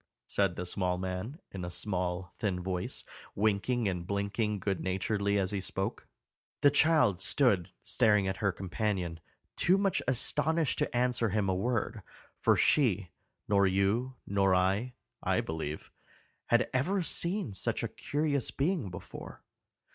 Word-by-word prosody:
said 100 -3 +1
the 90 - -4
small 90 0 0
man, 95 - -4
in 95 -2 -6
a 90 - -3
small 90 -1 -3
thin 95 -4 -1
voice, 90 0 -3 0.3
winking 110 +3 +1
and 90 -2 -3
blinking 100 +2 -1
good 95 0 -2
naturedly 100 +2 0
as 95 0 0
he 100 -2 -2
spoke. 95 +1 -3 0.5
The 145 - +6
child 150 - +4
stood 95 -4 +2
staring 105 -5 +3
at 95 0 -2
her 100 -2 +1
companion, 95 -2 -2 0.4
too 185 +2 +3
much 195 -1 +1
astonished 150 +4 +2
to - - 0
answer 125 -2 +2
him 105 0 0
a 95 - +2
word, 110 +2 -1 0.4
for - - +4
she, 105 - +2 0.4
nor 100 -1 +4
you, 100 +7 +1
nor 95 -1 +3
I, 100 +7 +1 0.3
I - - +1
believe, 80 -1 -4 0.6
had 120 0 +3
ever 175 +9 +1
seen 175 - 0
such - - -1
a - - 0
curious 145 -3 -1
being 145 - -1
before. 90 - -9
100 Hz, 145 wpm, -31 LUFS, 95-125 Hz, 0.6 s, The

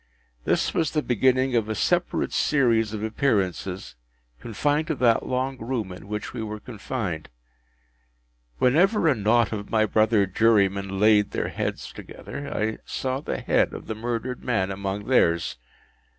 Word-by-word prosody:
This - - +1
was 160 -3 +1
the 150 -1 -1
beginning 130 +2 +2
of 110 -2 +1
a 110 - -1
separate 175 - 0
series 115 -7 +2
of 110 -1 -4
appearances, 100 - -1 0.5
confined 145 - -1
to 160 - -1
that 120 -3 +2
long 130 0 -2
room 115 -4 -3
in 90 +2 -10
which 105 +1 -5
we 120 - -4
were 105 -1 -5
confined. 105 -7 -5 1.3
Whenever 180 - +3
a 150 - +5
knot 110 0 +2
of 105 -2 -5
my 110 -1 +3
brother 110 -1 +3
jurymen 100 -1 +2
laid 105 -1 +5
their - - -2
heads - - -4
together, 140 0 -8
I 110 +1 -2
saw 130 0 -3
the - - -4
head - - +1
of - - -8
the - - -3
murdered 120 +3 -4
man 100 -6 0
among 100 +1 -4
theirs. 85 -10 +2
110 Hz, 150 wpm, -25 LUFS, 105-130 Hz, 1.3 s, a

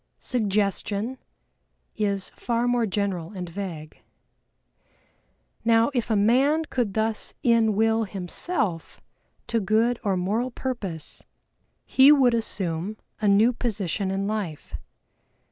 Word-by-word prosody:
"Suggestion" 210 +1 -1 0.8
is 200 -3 -1
far 235 0 -1
more 245 -2 +2
general 195 -3 -2
and 180 -1 -5
vague. 170 -4 -7 1.6
Now 230 +3 +4
if 240 -3 -1
a 220 - +2
man 265 +10 +3
could 240 -9 -2
thus 220 0 -1
in 230 -3 +3
will 225 +1 +2
himself 190 - -3 0.5
to 230 - 0
good 225 +4 +1
or 195 -3 +1
moral 210 +8 0
purpose, 215 - -5 0.6
he 270 +2 +6
would 265 -5 +5
assume 195 -3 -1 0.2
a 210 - +2
new 210 +5 +5
position 205 -5 -2
in 195 +1 -1
life. 200 -8 -4
215 Hz, 110 wpm, -25 LUFS, 195-235 Hz, 1.6 s, he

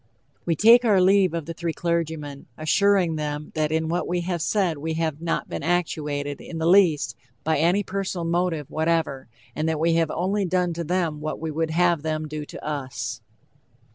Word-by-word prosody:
We 165 - +2
take 230 +8 +7
our 210 -5 +4
leave 185 -2 +4
of 165 -3 -3
the 165 - -5
three 165 0 -3
clergymen, 160 -5 -3
assuring 180 +1 +2
them 150 0 -4
that 155 -1 0
in 160 0 0
what 175 +2 -1
we 175 0 -1
have 175 -1 -2
said 175 -4 0
we 160 +2 -3
have 160 -2 -2
not 165 -1 -1
been - - -5
actuated, 150 -4 -1
in 165 - -7
the 160 - -1
least, 175 -4 +4 0.3
by 160 -2 +1
any 175 +6 +3
personal 190 -3 -3
motive 170 -3 -1
whatever, 160 -4 0 0.3
and 155 +1 0
that 160 -1 -1
we 165 +1 +2
have 165 -1 +2
only 195 +5 0
done 180 -1 0
to 170 +1 -4
them 170 -2 -1
what 155 +1 -4
we 160 0 -3
would 160 +1 -1
have 170 0 +2
them 155 0 -2
do 150 0 -5
to - - -10
us. 130 -7 -4
165 Hz, 195 wpm, -24 LUFS, 155-175 Hz, 0.3 s, take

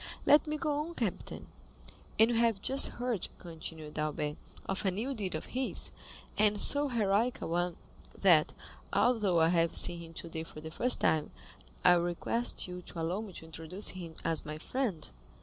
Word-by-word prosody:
"Let 295 +1 +5
me 305 0 -2
go 300 -1 -1
on, 335 +3 -7
captain. 220 -7 -4 0.7
And 225 +2 +5
we 235 - 0
have 230 -4 +2
just 270 +7 +2
heard," 240 -5 -2
continued 160 -3 -8
Albert, 150 0 -2 0.3
"of 190 - -2
a 195 - +3
new 220 +9 -3
deed 200 -8 -3
of 155 - -5
his, 260 +1 -1 0.5
and 210 -1 +3
so 285 +6 +9
heroic 230 -1 +1
a - - -5
one, 175 +1 -1 0.4
that, - - +4 0.4
although 210 -8 +2
I 160 - +4
have 170 -1 +2
seen 170 - +2
him 165 -1 -10
today 165 -1 -5
for 155 - -11
the 160 +1 -8
first 250 +9 +1
time, 155 -2 +2 0.6
I - - +8
request 175 +8 -1
you 180 0 -7
to 170 - -9
allow 170 +5 -2
me 215 -3 -8
to 160 - -8
introduce 160 +5 -3
him 170 -3 -7
as 165 - +1
my 150 0 -6
friend." 210 - -3
185 Hz, 180 wpm, -31 LUFS, 165-235 Hz, 0.7 s, so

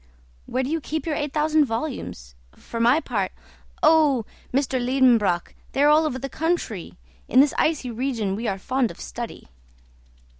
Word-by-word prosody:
"Where 255 +2 -1
do 260 - -3
you 325 0 -1
keep 315 +3 -4
your 320 - -1
eight 295 -1 -2
thousand 305 0 +3
volumes? 225 - -5 0.2
For 230 - -7
my 240 +6 +4
part 200 -10 -2 0.3
" - - -30
"Oh, 295 -8 +4 0.3
M. 265 - +3
Liedenbrock, 250 -8 +2 0.2
they 275 - +2
are 295 - +6
all 310 +1 +5
over 260 - -3
the 275 - -4
country. 275 - -2 0.3
In 255 - +4
this 280 +1 +5
icy 300 -6 0
region 230 -5 -2
we 225 +3 -3
are 195 - -1
fond 255 +4 0
of - - -11
study. 235 -1 -7
260 Hz, 175 wpm, -24 LUFS, 225-295 Hz, 0.3 s, are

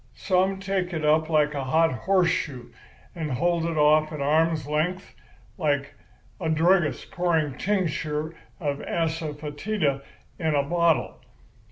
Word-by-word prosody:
Some 190 0 +1
take 190 -2 -2
it 155 -2 -2
up 155 +1 +3
like 150 -2 +2
a 140 -2 -3
hot 160 +5 +3
horseshoe, 150 - 0 0.4
and 155 -5 -4
hold 170 +4 +1
it 165 -1 -2
off 155 +1 +4
at 150 - -6
arm's 155 +1 +2
length 160 +6 -2 0.5
like 145 -3 0 0.5
a 165 -4 -2
druggist 165 +1 +2
pouring 160 -5 0
tincture 160 -5 -1 0.3
of 145 -4 -2
asafœtida 155 0 -2 0.4
in 160 -3 0
a 140 - +2
bottle. 170 +1 +1
160 Hz, 130 wpm, -25 LUFS, 150-175 Hz, 0.5 s, off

